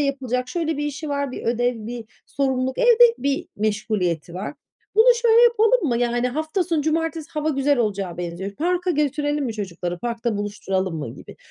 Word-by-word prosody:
yapılacak 255 -3 -1
şöyle 320 0 -1
bir 295 - -2
işi 300 +2 -5
var, 280 -2 -2
bir - - -6
ödev, 235 -1 0
bir 235 -1 -6 0.2
sorumluluk, 260 -1 -1
evde 480 -1 +6
bir 280 0 -1
meşguliyeti 205 -6 -1
var. 190 +10 -5 0.4
Bunu 480 +3 +7
şöyle 465 0 +6
yapalım 470 -4 +4
mı? 235 -2 +1
Yani, 240 +1 +1
hafta 315 +7 -1
sonu 330 -3 0
cumartesi 325 0 -1
hava 305 0 -2
güzel 280 -1 +2
olacağa 200 -6 -1
benziyor. 175 +3 -4
Parka 360 +2 0
götürelim 295 -1 0
mi 235 - -3
çocukları? 180 -4 -4
Parkta 235 0 -2
buluşturalım 195 -3 -2
mı?" 145 -7 -5
gibi. - - -13
260 Hz, 170 wpm, -22 LUFS, 215-315 Hz, 0.4 s, Bunu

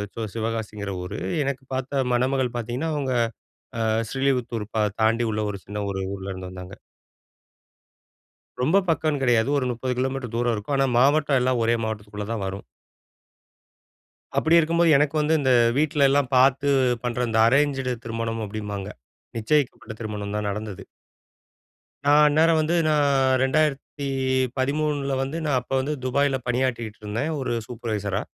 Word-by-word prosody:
C 115 - -4
சிவகாசிங்கிற 110 -3 -3
ஊரு. 100 +4 -5 0.2
எனக்கு 135 -1 -3
பார்த்த 130 +1 -1
மணமகள் 130 0 0
பாத்தீங்கன்னா, 120 +8 -3
அவுங்க 135 -3 -1 0.7
அ, - - 0 0.3
ஸ்ரீலிபுத்தூர் 125 -5 -1
ப - - 0 0.2
தாண்டி 115 +2 +3
உள்ள 105 - -1
ஒரு 100 - -6
சின்ன 105 +1 -4
ஒரு 95 -1 -3
ஊர்ல 95 0 -6
இருந்து 95 -1 -7
வந்தாங்க. 90 +1 -9 1.9
ரொம்ப 155 +10 +3
பக்கம்னு 155 -3 +1
கிடையாது. 120 0 +3
ஒரு 135 - 0
30 125 +2 -2
கிலோமீட்டர் 130 -2 -2
தூரம் 120 0 +1
இருக்கும். 105 +7 -3
ஆனா, 135 0 +3
மாவட்டம் 145 0 +3
எல்லாம் 125 -1 +1
ஒரே 115 +1 +3
மாவட்டத்துக்குள்ள 105 -1 -5
தான் 110 -3 -2
வரும். 95 +1 -5 1.7
அப்படி 160 +2 +4
இருக்கும்போது 170 +1 +2
எனக்கு 150 +2 +1
வந்து, 150 +2 +1
இந்த 130 -2 +2 0.3
வீட்ல 145 -1 +3
எல்லாம் 140 -1 +1
பாத்து 135 +2 +4 0.3
பண்ற 125 0 -2
இந்த 110 - +1
அரேன்ஜட் 135 0 +2
திருமணம் 115 0 -3
அப்டின்பாங்க, 100 -1 -5 0.5
நிச்சயிக்கப்பட்ட 125 -1 0
திருமணம் 105 -1 -4
தான் 105 - -2
நடந்தது. 105 -2 -6 1.2
நான் 145 +1 +6
அந்நேரம் 160 +2 +4
வந்து, 155 +2 0
நான் 150 -2 +3 0.4
2013 135 0 0
வந்து, 135 +5 -3
நான் 140 -3 +2
அப்ப 125 - -22
வந்து, 145 +3 -1
துபாயில 135 +1 +1
பணியாற்றிட்டு 120 -3 -1
இருந்தேன் 110 +9 -2
ஒரு 130 -3 -2
சூப்பர்வைசரா. 105 -4 -3
130 Hz, 140 wpm, -24 LUFS, 110-140 Hz, 1.9 s, நான்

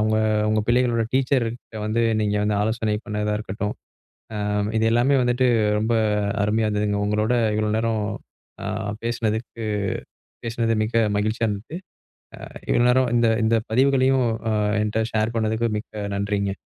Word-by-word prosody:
அவங்க 110 0 +2 0.3
உங்க 110 0 +2
பிள்ளைகளோட 120 -1 +2
டீச்சர் 130 -3 +2 0.4
வந்து 115 +2 +1 0.2
நீங்க 105 0 0
வந்து 105 -1 +1
ஆலோசனை 110 -1 0
பண்ணதா 105 -1 -1
இருக்கட்டும். 105 0 -4 0.6
ஆ - - -3 0.4
இது 110 - +1
எல்லாமே 120 +4 +3
வந்துட்டு 125 +1 +2 0.3
ரொம்ப 110 +2 0 0.5
அருமையா 110 +1 +1
இருந்ததுங்க. 105 -1 0
உங்களோட 105 +3 +1 0.2
இவ்வளோ 105 0 0
நேரம் 110 -1 0 0.6
ஆ - - -5 0.4
பேசுனதுக்கு 115 0 -2 0.8
பேசுனது 115 -1 0
மிக 115 +1 +1
மகிழ்ச்சியா 110 +2 0
இருந்தது. 105 +10 -5 0.7
ஆ - - -9 0.2
இவ்வளோ 120 - +3
நேரம் 125 -1 +3
இந்த 115 -1 +4 0.2
இந்த 115 +1 +3 0.2
பதிவுகளையும் 130 0 +3 0.2
ஆ - - +1 0.3
என்கிட்ட 105 +1 0
ஷேர் 110 +1 0
பண்ணதுக்கு 110 +1 0
மிக்க 105 -1 -6
நன்றிங்க. 100 -1 -1
110 Hz, 135 wpm, -23 LUFS, 105-120 Hz, 0.8 s, இந்த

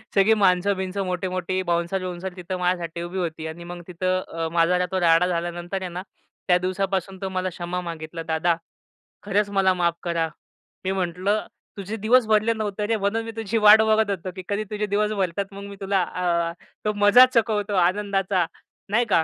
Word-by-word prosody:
सगळी 200 +3 +5
माणसं-बिन्स, 190 -1 +1
मोठी-मोठी 185 -1 -2
बाउन्सर-बिउन्सर 180 +1 -2
तिथं 180 +1 -4
माझ्यासाठी 175 -2 -1
उभी 175 +2 -5
होती 160 -3 -3
आणि 170 +2 -8
मग 175 0 -8
तिथं 185 +1 0
अ, 165 0 -2
माझा 175 +2 +3
तो 190 - 0
राडा 165 +1 +5
झाल्यानंतर 175 +2 -3
आहे 185 - -4
ना, 180 +2 -6 0.4
त्या 180 - +5
दिवसापासून 190 +1 -2
तो 190 - -2
मला 185 0 0
क्षमा 175 +1 -4
मागितला, 165 -1 -6
"दादा 165 +1 +1 0.7
खरंच 205 0 +1
मला 190 -1 +4
माफ 175 -2 +1
करा." 170 -2 0 0.6
मी 190 - +1
म्हटलं, 190 +3 -1 0.3
"तुझे 200 +2 -5
दिवस 240 +2 +5
भरले 215 +1 +3
नव्हते 210 -2 -3
रे 225 - +2
म्हणून 210 +3 0
मी 225 - -5
तुझी 225 0 -2
वाट 215 +1 +9
बघत 220 -1 +3
होतो 185 -1 -4
की 185 - -7
कधी 205 +1 0
तुझे 210 0 -1
दिवस 210 +1 0
भरतात 185 +2 -1
मग 200 0 -8
मी 200 - -8
तुला 195 -1 +1
अ, 170 -1 -1 0.3
तो 210 - +1
मजा 235 +5 +9
चकवतो 210 -3 +1
आनंदाचा," 195 -2 0 0.4
नाही 230 +4 +2
का. 185 -7 +3
185 Hz, 180 wpm, -24 LUFS, 175-205 Hz, 0.7 s, वाट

